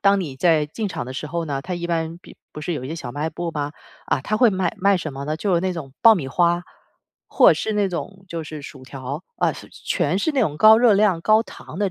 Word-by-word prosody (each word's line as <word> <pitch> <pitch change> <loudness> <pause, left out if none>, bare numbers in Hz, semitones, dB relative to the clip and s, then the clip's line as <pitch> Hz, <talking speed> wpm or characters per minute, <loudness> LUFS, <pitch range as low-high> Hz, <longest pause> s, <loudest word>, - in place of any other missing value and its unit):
当 200 0 +4
你 145 -7 -5
在 155 0 +3
进 210 +8 -4
场 125 - -4
的 130 - -6
时 145 - -5
候 170 +2 -3
呢， 140 -3 -3
它 180 +5 -5
一 175 0 -4
般 165 0 -2
比 - - -16 0.2
不 150 - -8
是 170 +3 -3
有 130 -5 -4
一 - - -6
些 160 - -4
小 145 -7 -6
卖 150 +4 -2
部 175 -1 -4
吗？ 145 -2 -3 0.3
啊， - - +1
它 215 +10 -1
会 240 0 +5
卖 190 -1 -1
卖 195 +1 +4
什 155 -4 -5
么 135 +1 -6
呢？ 155 +1 -2
就 190 +1 0
是 170 - +2
那 185 0 -1
种 145 -6 -7
爆 225 -1 +8
米 140 -8 -3
花， 175 +3 +2 0.6
或 - - +5
者 - - +4
是 220 - -2
那 205 -1 +1
种， 190 +2 -6
就 165 -1 -5
是 155 -1 -8
薯 135 -2 -11
条， 135 +5 -7
啊， - - +1
是 - - -11
全 - - -1
是 315 - +1
那 275 -3 0
种 150 -9 0
高 220 +3 +7
热 240 -3 +5
量、 195 -4 +3
高 215 +5 +4
糖 180 - -11
的 200 -2 +1
170 Hz, 290 characters per minute, -22 LUFS, 150-195 Hz, 0.6 s, 爆